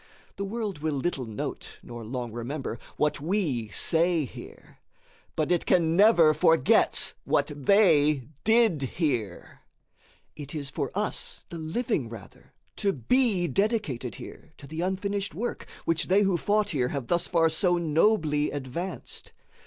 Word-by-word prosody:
The 200 - -4
world 210 -4 -4
will 155 -1 -1
little 135 -2 -2
note 110 -2 -6
nor 120 -1 -8
long 120 +1 -5
remember 120 +1 -5 0.2
what 150 -1 0
we 155 - -1
say 165 - +2
here, - - -13 0.6
but 155 +2 0
it 175 - +1
can 165 -2 +3
never 175 -6 +6
forget 160 -3 +3
what - - +1
they 150 -4 +4 0.2
did 220 -8 +3 0.2
here. 120 - -2 0.8
It 145 0 -8
is 140 -3 -4
for - - -2
us, - - -2
the 170 - -7
living, 160 - -2
rather, 110 -4 -13 0.2
to 200 - +1
be 195 - +1
dedicated 155 - -1
here 160 - -11
to 145 - -12
the 160 +4 -5
unfinished 195 +2 -2
work 240 +2 -4 0.2
which 165 0 +1
they 195 +3 +4
who 195 -2 +2
fought 205 +4 +1
here 130 -6 0
have 135 -1 -4
thus 175 +7 0
far 165 -2 +3
so 175 +2 +2
nobly 160 -2 +2
advanced. 145 +7 -6
160 Hz, 145 wpm, -27 LUFS, 140-195 Hz, 0.8 s, never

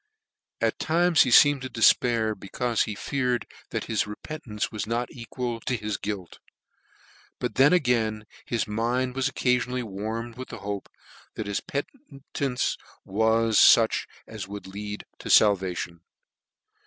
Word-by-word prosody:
At - - 0
times 170 +1 +3
he 130 - +4
Teemed 145 +3 +7
to 130 - -5
defpair, 115 -1 +3
becaufe 115 +4 -1
he 105 - -5
feared 125 -1 -1 0.2
that - - -3
his 110 -2 -1
repentance 105 0 -5
was 105 -1 -4
not 120 +2 -2
equal 120 0 -5
to 125 - -2
his 105 -2 -3
guilt; 100 -5 -6 1.0
but - - -3
then 135 +3 +5
again 115 -10 +1 0.2
his 115 -2 -1
mind 120 +4 -1
was 135 0 +1
occafionally 125 -1 0
warmed 110 +3 -5
with 130 - -6
the - - -7
hope 100 -1 -5 0.5
that 110 - -4
his 100 0 -2
penetance 140 - -3 0.3
was 110 +2 +2
fuch 115 -1 +5 0.2
as - - -7
would 100 +1 -8
lead 105 +2 -6
to - - -7
falvation. 90 -4 +3
115 Hz, 140 wpm, -26 LUFS, 105-125 Hz, 1.0 s, Teemed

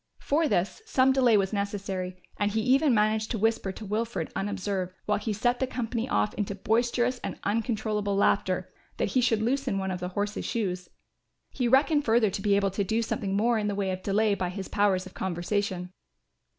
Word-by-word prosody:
For 310 +3 +1
this 195 - 0
some 265 -9 +4
delay 250 -5 +4
was 195 +1 0
necessary, 195 -2 -3 0.2
and 205 - +2
he 220 +2 0
even 270 +5 +4
managed 215 -1 +2
to 230 - -1
whisper 225 -2 +1
to 215 - -9
Wilfred 225 +3 -2
unobserved, 195 -2 -2
while 210 - +1
he 220 - -3
set 245 +4 +1
the 260 - 0
company 235 -2 -3
off 105 0 +1
into 200 -1 -3
boisterous 240 +4 +1
and - - -5
uncontrollable 215 -2 -1
laughter, 195 -2 +1 0.2
that - - 0
he 255 - +2
should 225 -3 +2
loosen 255 -3 0
one 190 0 -2
of 180 - -3
the 180 0 -3
horse's 205 +1 -1
shoes. 185 -5 -2 0.6
He 250 - -1
reckoned 290 +4 +4
further 225 -3 +3
to 195 - -4
be 205 -1 +3
able 200 -1 +2
to 200 +2 -1
do 220 +4 0
something 200 -4 -2
more 230 +2 +2
in 210 - -1
the 205 - -1
way 195 -1 -1
of 185 0 -4
delay 210 +2 +2
by 185 -3 -1
his 190 +1 -6
powers 195 -2 +1
of 185 - -11
conversation. 185 0 -2
210 Hz, 200 wpm, -27 LUFS, 195-230 Hz, 0.6 s, some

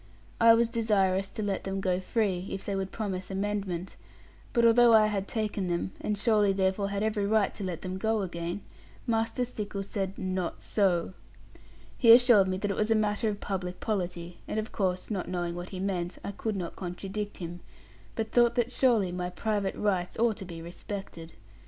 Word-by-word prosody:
I 230 0 +8
was 235 0 +3
desirous 195 -4 +1
to 215 - -5
let 200 -2 -1
them 195 0 -3
go 185 -2 0
free, 190 -2 -1
if 195 - -5
they 200 - -2
would 195 0 -3
promise 190 -4 -4
amendment; 195 -2 -3 0.5
but 235 -2 +3
although 230 0 +7
I 215 -1 +7
had 200 -2 -1
taken 210 -4 -2
them, 175 +1 -1
and 210 - -1
surely 210 -2 +3
therefore 190 +1 +1
had 200 +1 -1
every 210 -2 0
right 215 -1 +2
to 205 - -7
let 180 -4 -4
them 185 0 -4
go 220 0 +1
again, 175 +1 -4 0.4
Master 230 +2 0
Stickles 205 -4 -5
said, 195 -2 -3
'Not 185 -2 -3
so.' 185 -4 +1 0.9
He 230 -3 +7
assured 235 -5 +7
me 185 0 -1
that 200 +1 -1
it 195 - -3
was 215 +1 +1
a 225 - +4
matter 215 +1 +1
of 205 -1 -4
public 180 -2 -3
polity; 175 -5 -3
and 220 - -1
of 215 - -4
course, 185 0 -1
not 195 -4 -2
knowing 175 -1 -2
what 175 +1 -6
he 185 - -6
meant, 185 -2 -2
I - - -3
could 215 +1 -3
not 180 -3 -4
contradict 195 +3 -5
him; 175 0 -6 0.6
but 220 -1 -2
thought 240 -1 +4
that 240 0 +1
surely 235 -8 +3
my 180 0 -3
private 205 0 -1
rights 185 -4 -1
ought 230 -2 +2
to 195 - -6
be 165 -2 -8
respected. 170 -1 -7
195 Hz, 195 wpm, -29 LUFS, 185-215 Hz, 0.9 s, I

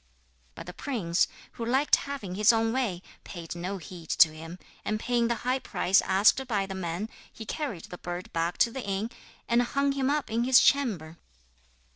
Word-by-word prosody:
But - - -8
the 180 - -8
prince, 190 - 0 0.2
who 235 - -7
liked 265 +5 +3
having 275 -10 -5
his 210 +4 +5
own 225 0 +1
way, 215 -9 -1 0.2
paid 170 -3 -7
no 180 +3 -4
heed 170 -2 -11
to 165 - +6
him, 165 +3 -9 0.3
and 215 0 -1
paying 240 0 +1
the 235 - 0
high 255 +1 +1
price 195 -6 +2
asked 205 +8 +3
by 205 -5 0
the 195 - -6
man, 185 +2 -3 0.2
he 220 - -9
carried 225 - -4
the 180 - -10
bird 175 +1 -6
back 165 +1 -1
to 235 - -8
the 265 - -5
inn, 200 +4 -2 0.4
and 235 +1 +3
hung 280 +3 +1
him 275 -1 0
up 295 -3 -1
in 230 +1 +1
his 255 0 +7
chamber. 185 - +1
215 Hz, 190 wpm, -28 LUFS, 175-245 Hz, 0.4 s, his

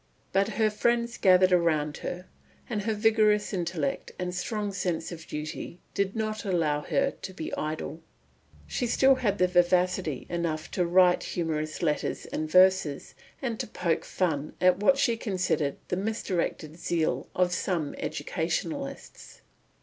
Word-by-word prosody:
But 195 +1 +3
her 220 -1 +3
friends 235 +2 +1
gathered 185 -1 +5
round 155 -4 +2
her, 180 +1 -5 0.4
and 215 -4 -2
her 220 - +1
vigorous 215 -1 +3
intellect 170 -6 -2
and 180 0 -3
strong 205 +2 -2
sense 180 -4 -2
of 165 -1 -9
duty 155 +3 -6
did 200 +1 -1
not 215 -1 -2
allow 165 -7 +1
her 275 - +1
to 190 - -9
be 160 - -5
idle. 155 +1 -4 0.6
She 245 - -2
still 265 +3 +5
had 225 -6 0
vivacity 180 -4 +2
enough 165 -3 -3
to 180 -2 0
write 180 0 +5
humorous 155 -2 -3
letters 150 -3 -1
and 155 0 -4
verses, 185 -4 +4 0.3
and 235 -4 -2
to - - -2
poke 175 -5 -1
fun 155 -5 -1
at 180 -1 +4
what 270 +7 +4
she 240 -4 +2
considered 185 -9 0
the 180 - 0
misdirected 185 -6 -2
zeal 155 -7 -1
of 180 -1 +2
some 170 -4 -1
educationalists. 275 - -4
180 Hz, 140 wpm, -28 LUFS, 160-210 Hz, 0.6 s, gathered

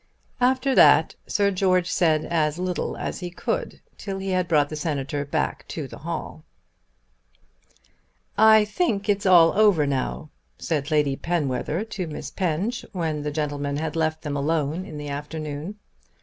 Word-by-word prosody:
After 260 +2 +2
that - - +6
Sir 200 -1 +2
George 185 -2 +2
said 160 -4 +2
as 155 -2 0
little 180 0 -2
as - - -4
he 180 -2 -5
could, 175 - -4 0.2
till 195 -2 -4
he 195 0 -4
had 185 -1 +1
brought 150 -3 +3
the 155 - -5
Senator 145 -2 -2
back 150 +1 -2
to 155 -4 -5
the - - -11
hall. 160 0 -6 1.9
"I 220 -1 +6
think 210 - -1
it's 200 -1 +1
all 170 -3 +7
over 205 -8 +4
now," 140 +2 -3 0.3
said 150 -4 -2
Lady 150 -3 +2
Penwether 155 +2 -1
to 195 -5 -5
Miss 150 - -7
Penge, 190 +6 -2
when 160 -5 -2
the 150 - -2
gentlemen 145 -1 -2
had 155 0 -3
left 160 -1 -1
them 145 -2 -3
alone 155 +4 -1
in 155 -6 -8
the 145 0 -6
afternoon. 150 +4 -5
160 Hz, 155 wpm, -24 LUFS, 150-190 Hz, 1.9 s, all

